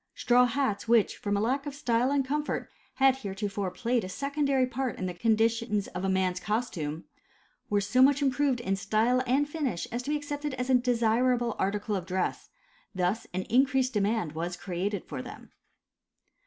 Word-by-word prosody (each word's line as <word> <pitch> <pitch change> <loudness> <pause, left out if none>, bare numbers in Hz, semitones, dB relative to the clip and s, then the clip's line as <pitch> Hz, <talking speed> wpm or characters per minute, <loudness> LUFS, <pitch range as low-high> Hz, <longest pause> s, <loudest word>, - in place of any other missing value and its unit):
Straw 245 +1 +4
hats 245 -5 -1
which 230 -2 +3
from 205 -1 -2
a - - 0
lack 270 +6 0
of 285 - -5
style 245 -3 +1
and 280 -1 +1
comfort 295 +2 -2 0.2
had 265 -1 +4
heretofore 200 -3 -3
played 235 +5 -1
a 185 - -5
secondary 280 +2 0
part 255 -1 -3
in 185 - -3
the 180 - -3
conditions 225 +1 +1
of 190 +1 -3
man's 185 -1 +1
costume, 175 -9 -3 0.7
were 205 -1 +2
so 225 +6 +2
much 275 +1 +6
improved 275 -2 +1
in 195 -4 0
style 225 +6 +1
and 275 +4 +2
finish 285 - -2
as 240 - -2
to 265 - -6
be 300 - +1
accepted 290 -1 -4
as 250 +1 -2
a - - +4
desirable 240 -1 +2
article 205 +2 -1
of 185 -2 -4
dress, 185 0 -2 0.5
thus 185 +4 -1
an 185 +1 -2
increased 260 +2 +2
demand 210 -4 0
was 170 +3 -4
created 190 +3 -3
for - - -5
them. - - -11
235 Hz, 175 wpm, -28 LUFS, 200-265 Hz, 0.7 s, much